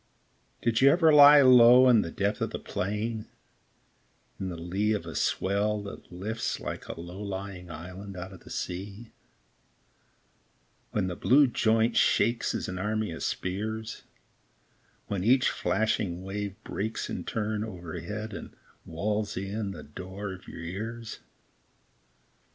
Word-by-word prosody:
Did 115 0 +2
you 135 - +8
ever 160 +1 +5
lie 145 0 +10
low 125 0 +8
In 120 -4 +6
the 85 - -4
depth 100 +4 -1
of - - 0
the - - -4
plain, 105 +3 -3 0.6
& - - -40
In 95 - -3
the 90 - -5
lee 95 +6 0
of 100 -6 -3
a 80 - -7
swell 100 +6 0
that 100 - -10
lifts 105 +6 -3
Like - - -6
a - - -7
low 90 +4 -8
lying 95 -3 -6
island 90 +4 -8
out 95 +2 -7
of 90 - -12
the - - -15
sea, 100 +5 -6 1.8
When 105 -3 -1
the 90 -1 -3
blue 140 +9 +5
joint 115 -1 +2
shakes 115 +3 +2
As - - -3
an 90 0 -4
army 105 0 -1
of 80 - -7
spears; 110 +4 -3 1.0
When 100 -3 -3
each 130 +4 +4
flashing 100 -4 -1
wave 100 0 -4
breaks 110 +3 -3
In - - -4
turn 105 -1 -2
overhead 95 +2 -6
And - - -8 0.3
wails 105 +5 -2
in 100 +2 -3
the 85 -6 -8
door 95 +6 -7
of 90 - -13
your 85 - -8
ears 110 +6 -6
105 Hz, 145 wpm, -28 LUFS, 95-110 Hz, 1.8 s, lie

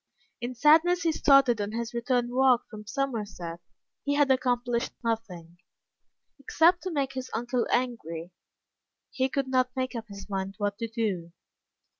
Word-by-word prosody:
In 245 +1 -4
sadness 325 +6 +5
he 330 - +3
started 275 -7 +4
on 205 +1 -3
his 235 +1 -3
return 240 0 0
walk 255 -2 +3
from 210 -1 -10
Somerset. 210 - -3 0.4
He 285 0 0
had 285 -2 +4
accomplished 245 -2 0
nothing 180 -7 -4 0.8
except 335 +6 +3
to 370 - -4
make 280 -4 -1
his 260 -1 -5
uncle 240 +2 -1
angry. 175 -9 -2 0.8
He 260 0 0
could 275 0 -1
not 255 -1 +2
make 260 0 -2
up 230 -2 -6
his 200 -2 -10
mind 195 -1 -3
what 205 -1 -2
to 230 - -2
do. 205 -7 -3
240 Hz, 150 wpm, -28 LUFS, 210-265 Hz, 0.8 s, sadness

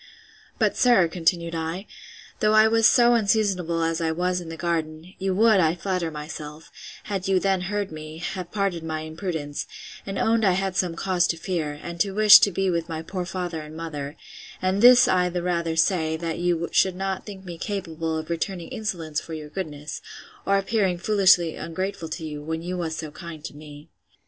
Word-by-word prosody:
But - - +2
sir, 235 -9 +5
continued 170 0 0
I, 165 +4 -3 0.5
though 215 -1 +3
I 215 0 +7
was 225 0 +5
so 240 +2 +5
unseasonable 195 -7 +1
as 165 +1 0
I 160 -1 +1
was 180 +2 -1
in 170 - -8
the 165 - -7
garden, 165 +1 -3
you 190 -1 -1
would, 220 0 +5
I 165 -1 +3
flatter 180 -1 -2
myself, 150 0 -8 0.3
had 195 -2 -3
you 190 -1 +3
then 190 -1 +1
heard 205 -3 -2
me, 155 0 -8
have 175 +1 -5
pardoned 195 -5 -1
my 155 -1 -3
imprudence, 155 -2 -4 0.4
and 195 0 -5
owned 225 0 +2
I 190 -3 +4
had 190 0 -1
some 180 -3 0
cause 180 0 +1
to 165 - -1
fear, 160 -4 -3
and 170 0 -7
to 195 +1 0
wish 215 0 +9
to 200 - +3
be 190 +1 0
with 170 0 -2
my 160 -1 -4
poor 180 +1 -4
father 180 -3 -4
and 155 +1 -10
mother: 150 -3 -5 0.4
and 185 +2 0
this 245 +1 +8
I 180 -1 +2
the 175 0 -3
rather 170 -2 -1
say, 160 -2 +2
that 165 0 -4
you 175 -1 0
should 190 -2 +3
not 190 +1 -3
think 195 -2 -9
me 170 -2 -8
capable 165 -5 -3
of 160 +1 -5
returning 170 +1 -3
insolence 165 -8 -3
for 165 - -7
your 150 -1 -8
goodness; 150 -4 -6 0.5
or 200 - +4
appearing 195 -2 +1
foolishly 185 -4 +4
ungrateful 170 0 -4
to 160 0 -5
you, 150 -1 -6
when 160 +2 -4
you 180 +1 -3
was 165 -3 -3
so 155 -2 -6
kind 165 -2 -9
to - - -7
me. 150 0 -12
175 Hz, 200 wpm, -24 LUFS, 160-195 Hz, 0.5 s, wish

